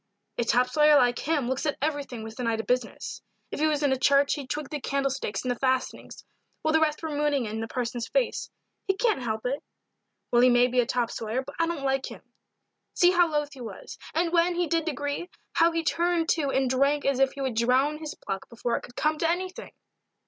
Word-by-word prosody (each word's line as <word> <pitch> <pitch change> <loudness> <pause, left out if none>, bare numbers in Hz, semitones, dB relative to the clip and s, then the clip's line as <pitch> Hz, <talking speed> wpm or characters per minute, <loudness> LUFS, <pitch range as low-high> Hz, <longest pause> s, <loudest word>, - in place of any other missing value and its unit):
"A - - +3
top 245 +2 +3
sawyer 300 +3 +5
like 245 -3 +4
him 295 -5 0
looks 260 +4 -1
at 295 - -1
everything 285 -6 -3
with 220 +3 -9
an 245 - -1
eye 230 - +2
to 225 - -3
business. 245 +1 -2 0.3
If - - -4
he 310 - +3
was 300 -1 0
in 285 - +3
a 265 - +1
church 280 +1 +4
he'd 280 -4 -6
twig 300 -1 -3
the 300 -2 -4
candlesticks 275 -4 -2
and 255 - -1
the 245 - -4
fastenings, 260 -1 -2 0.4
while 315 - +1
the 320 - +5
rest 310 0 0
were 320 - -3
mooning 290 -3 +1
into 220 +1 -4
the 225 - -3
parson's 240 -2 -3
face - - -1 0.4
he 385 - +2
can't 435 - +1
help 220 -2 -3
it." 275 +4 -1 0.7
"Well, 240 - +5
he 255 - +6
may 245 0 +5
be 250 0 +1
a 240 - +3
top 245 -3 0
sawyer, 230 +4 -3
but 285 - -10
I 330 - +2
don't 330 -5 -3
like 270 0 0
him. - - -11 0.7
See 355 0 +5
how 350 -2 +4
loth 295 -1 -1
he 265 - -11
was, 220 -5 -9 0.2
and, 335 +1 +1
when 345 +1 +3
he 350 0 +1
did 330 0 0
agree, 290 +4 -3 0.2
how 335 +1 +4
he 330 0 -1
turned 340 +2 +1
to 300 -4 +1
and 265 -1 +1
drank 275 +3 +2
as 275 -1 +1
if 270 0 +3
he 280 - -7
would 265 -2 -1
drown 255 +6 +2
his 310 -2 -6
pluck 195 -1 -6
before 235 0 -2
it - - -6
could 245 - -13
come 305 0 0
to 330 - +2
anything." 370 +2 -3
275 Hz, 235 wpm, -27 LUFS, 250-310 Hz, 0.7 s, he